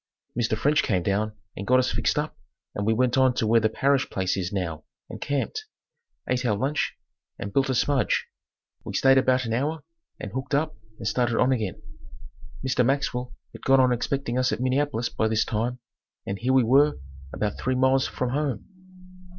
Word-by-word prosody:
Mr. 115 -2 0
French 150 +6 +3
came 95 -7 0
down 105 +3 0 0.2
and 100 - -6
got 130 - +5
us 130 0 +2
fixed - - 0
up - - -2 0.4
and 100 +1 -3
we - - +4
went 125 +3 +2
on 130 -1 +4
to 110 - 0
where 115 +2 +5
the 110 -1 +2
Parrish 135 +4 +1
place 95 -1 -1
is 95 -2 -3
now 85 -6 -3 0.3
and - - -8
camped, 145 - -2 0.6
ate 125 0 0
our 110 -4 +1
lunch 140 +6 -1 0.4
and 100 0 -6
built 135 0 +2
a 130 - +1
smudge. 135 +2 +1 0.6
We - - -6
stayed 135 0 +5
about 130 -1 +2
an 115 - -2
hour 150 +7 -1 0.4
and 105 - -6
hooked 130 +1 -2
up 150 -3 0 0.2
and 110 - -5
started 120 0 +1
on 125 - +3
again. 110 -8 -1 0.9
Mr. 125 -1 +2
Maxwell 125 -2 -1 0.2
had - - -12
gone 135 0 +4
on 130 -1 +4
expecting 125 0 -1
us 130 0 +2
at - - -2
Minneapolis 130 -1 0
by 110 - 0
this 110 0 +1
time 115 +3 -1 0.5
and 95 0 -4
here 130 +3 +1
we 130 -1 +5
were 140 +5 +4 0.3
about 105 -1 -3
three 130 0 0
miles 130 +1 +3
from 125 - -2
home. 140 -6 -2
125 Hz, 190 wpm, -25 LUFS, 110-135 Hz, 0.9 s, got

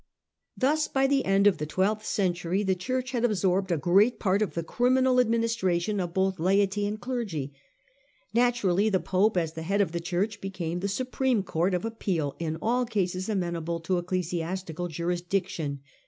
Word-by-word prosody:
Thus 300 +4 +2
by 270 0 +1
the 275 0 +2
end 195 +1 +3
of 205 -2 +4
the 150 - -3
twelfth 205 +6 0
century 180 0 0
the 190 -1 +2
Church 255 +7 -3
had 240 -3 -1
absorbed 190 -4 +1
a 170 - +2
great 195 - +3
part 195 0 +1
of 210 - -1
the 170 - -1
criminal 255 +6 +2
administration 220 -5 +1
of 175 -2 -2
both 190 0 +1
laity 200 +3 +2
and 210 +1 -4
clergy. 205 - -3 0.8
Naturally 220 -5 +2
the 190 -3 +2
Pope, 190 +3 +1
as 165 -2 0
the 160 - -6
head 195 +5 0
of 195 -5 +2
the 170 - -2
Church, 190 +5 -2
became 180 -3 -4
the 195 - -2
supreme 255 +1 0
court 180 +1 0
of 180 - -2
appeal 180 -10 -2
in 160 -1 -2
all 245 +3 +2
cases 190 -4 -2
amenable 170 -4 -2
to 180 +2 0
ecclesiastical 175 -1 -3
jurisdiction. 175 -3 -2
190 Hz, 170 wpm, -27 LUFS, 175-220 Hz, 0.8 s, of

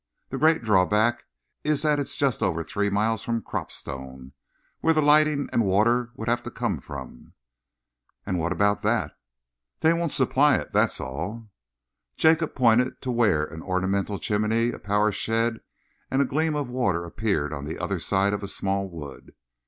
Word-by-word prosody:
The 135 - -4
great 160 -1 +3
drawback 105 +3 +2 0.4
is 150 -1 +1
that 150 -1 +2
it's 140 0 -3
just 135 -5 0
over 85 -6 0
three 100 +5 -1
miles 105 +2 0
from 115 -2 -2
Cropstone, 65 -1 -6 0.5
where 165 0 +2
the 155 - +3
lighting 150 -1 +4
and 115 - +3
water 115 +5 +2
would 110 -2 -7
have 120 +1 +1
to - - -7
come - - -2
from." 65 -3 -10 0.9
"And 90 - -1
what 85 +2 -1
about 100 +2 +1
that?" - - 0 0.7
"They 160 +1 +5
won't 170 -2 -1
supply 135 +2 +3
it, - - -4
that's - - +2
all." 100 - -6 0.7
Jacob 160 0 +3
pointed 125 0 +3
to 130 - -1
where 110 -11 +2
an 80 +1 -7
ornamental 95 +2 -1
chimney, 110 +4 0
a - - -8
power 105 +1 +1
shed 115 +2 0 0.5
and 135 - 0
a 140 - +4
gleam 155 +3 0
of 145 -3 -2
water 100 -9 -1
appeared 85 -6 -1
on 70 -1 -5
the 80 - -5
other 100 -3 -2
side 100 +3 +1
of 105 - -2
a 100 - -4
small 95 0 -1
wood. 75 -6 -10
110 Hz, 170 wpm, -25 LUFS, 95-130 Hz, 0.9 s, They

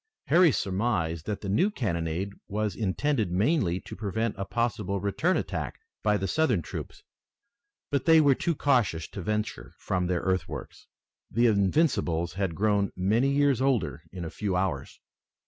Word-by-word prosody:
Harry 170 +1 +6
surmised 95 -7 -1
that 105 -2 -3
the 100 - -5
new 165 - +3
cannonade 90 - -2 0.2
was 105 -1 -2
intended 110 0 0
mainly 95 - +1
to - - -9
prevent 110 +2 -2
a 95 - -4
possible 115 -3 -1
return 130 - +1
attack - - -4 0.2
by 105 -1 +2
the 95 0 -2
Southern 130 - +1
troops, - - -7 0.9
but 140 -3 0
they 165 -1 +7
were 145 -3 +5
too 170 +5 -1
cautious 120 - +1
to 100 - -7
venture 105 +3 -3
from 90 -1 -1
their 90 -1 0
earthworks. 95 -1 -3 0.4
The 120 +3 +2
Invincibles 100 - +2
had 95 -3 -2
grown 100 0 +1
many 110 +9 +2
years 140 -2 +2
older 115 - +1
in 90 -2 -6
a 80 - -6
few 100 -3 -2
hours. 90 -7 -2
105 Hz, 155 wpm, -28 LUFS, 90-130 Hz, 0.9 s, they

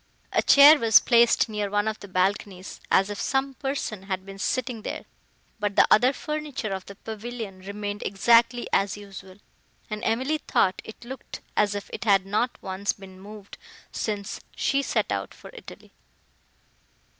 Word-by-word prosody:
A - - +3
chair 290 +2 +8
was 225 -3 +6
placed 235 -1 +4
near 210 -2 -3
one 205 +1 0
of 215 0 -2
the 200 - -10
balconies, 190 0 -2
as 195 +2 +3
if 205 - -5
some 270 +1 0
person 270 -7 -4
had 190 0 -3
been 195 0 -10
sitting 245 +1 -2
there, - - -6 0.5
but 205 -1 -2
the - - +6
other 245 +5 +6
furniture 300 -6 -4
of 190 -1 -5
the 200 - -10
pavilion 220 -2 -7
remained 205 +1 -5
exactly 230 +4 +3
as 195 0 +1
usual, 195 -2 -11 0.6
and 215 +1 -4
Emily 260 +7 0
thought 190 -9 +1
it 220 +2 -12
looked 265 +2 -9
as 205 -1 +2
if 200 - -5
it - - -5
had 195 -3 +4
not 215 +5 -1
once 190 +2 -2
been 190 -1 -14
moved 205 0 -12 0.3
since 205 -2 -4 0.2
she 275 0 +1
set - - -1
out - - -3
for - - -13
Italy. 475 - -13
210 Hz, 165 wpm, -25 LUFS, 195-240 Hz, 0.6 s, chair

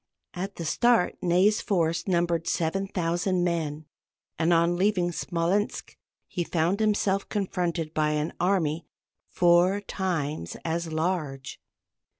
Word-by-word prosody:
At 190 +2 -5
the 170 - -5
start 235 +3 +2
Ney's 185 +4 +3
force 170 -3 0
numbered 170 -2 +1
7000 180 +1 0
men, 155 -3 -2 0.5
and 165 +1 +2
on 170 +1 +3
leaving 180 -2 +1
Smolensk 175 +4 -1 0.3
he 175 - -2
found 170 +4 0
himself 205 -2 +1
confronted 175 -5 -2
by 150 -1 +1
an 150 +1 -1
army 170 -4 0 0.4
four 175 +3 +4
times 160 - -3
as 165 0 -2
large. 155 -5 -3
175 Hz, 115 wpm, -27 LUFS, 165-190 Hz, 0.5 s, four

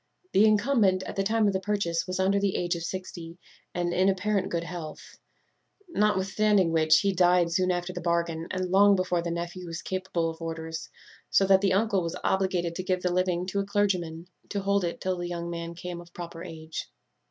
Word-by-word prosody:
The 205 - +5
incumbent, 210 -3 +3
at - - -6
the 195 - +1
time 220 +2 +2
of 200 - +2
the 190 - 0
purchase, 190 -4 -1
was 185 +1 -3
under 195 +1 +3
the 200 -1 0
age 175 0 0
of 170 - -5
sixty, 170 -2 -6 0.4
and 175 -1 0
in 185 +2 +3
apparent 195 0 0
good 170 -1 -1
health; 170 -2 -8 0.7
notwithstanding 205 - +2
which, 160 -1 +4
he 200 -1 +1
died 180 -1 +4
soon 185 +2 +2
after 175 0 -1
the 180 - -5
bargain, 170 -1 -1
and 185 -1 -2
long 200 +1 +6
before 180 -2 0
the 170 - -3
nephew 175 +1 -4
was 165 0 -6
capable 185 -3 -2
of 160 +1 -13
orders; 160 0 -5 0.4
so 195 - +4
that 190 0 +5
the 195 -2 +2
uncle 200 -1 +2
was 165 -1 -3
obliged 185 -3 +1
to 185 - -4
give 185 -1 -1
the 180 -1 +1
living 180 -1 +1
to 195 +2 -2
a - - +1
clergyman, 180 -5 -1 0.2
to 200 - -2
hold 200 0 +1
it 170 - -3
till 185 -1 -1
the 175 - -3
young 170 0 -4
man 170 0 -5
came 175 0 -6
of 175 0 -16
proper 170 -1 -7
age. 160 -2 -7
180 Hz, 210 wpm, -27 LUFS, 170-195 Hz, 0.7 s, long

